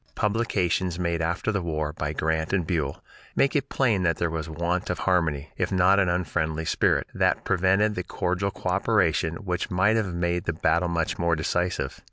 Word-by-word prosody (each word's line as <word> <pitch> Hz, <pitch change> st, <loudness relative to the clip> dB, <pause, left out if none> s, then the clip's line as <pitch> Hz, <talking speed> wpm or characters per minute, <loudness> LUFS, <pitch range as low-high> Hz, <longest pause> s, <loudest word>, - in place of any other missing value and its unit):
Publications 95 Hz, -5 st, 0 dB
made 85 Hz, -2 st, -1 dB
after 85 Hz, +6 st, -1 dB
the 100 Hz, -3 st, -1 dB
war 75 Hz, -3 st, -2 dB
by 75 Hz, -1 st, -3 dB
Grant 80 Hz, +2 st, -1 dB
and 90 Hz, -4 st, +1 dB
Buell 75 Hz, -5 st, -2 dB, 0.3 s
make 140 Hz, -, +2 dB
it 140 Hz, -2 st, 0 dB
plain 115 Hz, -8 st, +1 dB
that 85 Hz, -2 st, +1 dB
there 85 Hz, -1 st, -1 dB
was 80 Hz, -1 st, -4 dB
want 85 Hz, +3 st, -2 dB
of 90 Hz, -, -1 dB
harmony, 80 Hz, -6 st, 0 dB
if 90 Hz, 0 st, -1 dB
not 95 Hz, +1 st, +4 dB
an 95 Hz, -3 st, +2 dB
unfriendly 80 Hz, -3 st, -1 dB
spirit, -, -, +2 dB
that -, -, +1 dB
prevented 95 Hz, +4 st, +2 dB
the 90 Hz, -, -3 dB
cordial 90 Hz, +2 st, -1 dB
coöperation 80 Hz, -3 st, 0 dB
which 90 Hz, 0 st, -2 dB
might 100 Hz, +3 st, +3 dB
have 105 Hz, -5 st, -1 dB
made 85 Hz, 0 st, -1 dB
the 85 Hz, -, 0 dB
battle 85 Hz, +2 st, +1 dB
much 85 Hz, 0 st, -1 dB
more 85 Hz, -1 st, +2 dB
decisive. 90 Hz, +3 st, -2 dB
90 Hz, 185 wpm, -26 LUFS, 80-95 Hz, 0.3 s, not